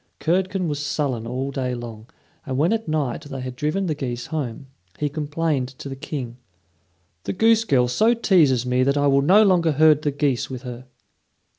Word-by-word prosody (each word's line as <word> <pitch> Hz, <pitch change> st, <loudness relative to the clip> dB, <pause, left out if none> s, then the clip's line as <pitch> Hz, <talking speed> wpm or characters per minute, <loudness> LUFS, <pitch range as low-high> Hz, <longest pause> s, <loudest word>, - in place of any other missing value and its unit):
Curdken 185 Hz, +2 st, 0 dB
was 145 Hz, -1 st, -3 dB
sullen 130 Hz, -6 st, -2 dB
all 130 Hz, +3 st, -3 dB
day 130 Hz, -2 st, -2 dB
long, 115 Hz, -1 st, -9 dB, 0.3 s
and 130 Hz, -3 st, -4 dB
when 165 Hz, +9 st, +2 dB
at 225 Hz, -3 st, -2 dB
night 155 Hz, -4 st, -1 dB
they 135 Hz, -2 st, -6 dB
had 130 Hz, -1 st, -6 dB
driven 155 Hz, +9 st, -1 dB
the 160 Hz, -, 0 dB
geese 125 Hz, -4 st, -4 dB
home, 135 Hz, -5 st, -4 dB, 0.3 s
he 150 Hz, -, -1 dB
complained 150 Hz, -2 st, -1 dB
to -, -, -8 dB
the 135 Hz, -, -5 dB
King: 130 Hz, -3 st, -6 dB, 0.9 s
"The -, -, -2 dB
goose 225 Hz, +2 st, +3 dB
girl 125 Hz, -, +3 dB
so 220 Hz, -, +3 dB
teases 155 Hz, -, +3 dB
me 125 Hz, 0 st, +1 dB
that 140 Hz, +2 st, +2 dB
I 145 Hz, -, +2 dB
will 140 Hz, -1 st, +4 dB
no 190 Hz, +9 st, +6 dB
longer 175 Hz, -5 st, +3 dB
herd 155 Hz, 0 st, +5 dB
the 150 Hz, -, 0 dB
geese 140 Hz, -3 st, -1 dB
with 130 Hz, -1 st, -7 dB
her." 125 Hz, 0 st, -8 dB
145 Hz, 190 wpm, -22 LUFS, 125-160 Hz, 0.9 s, no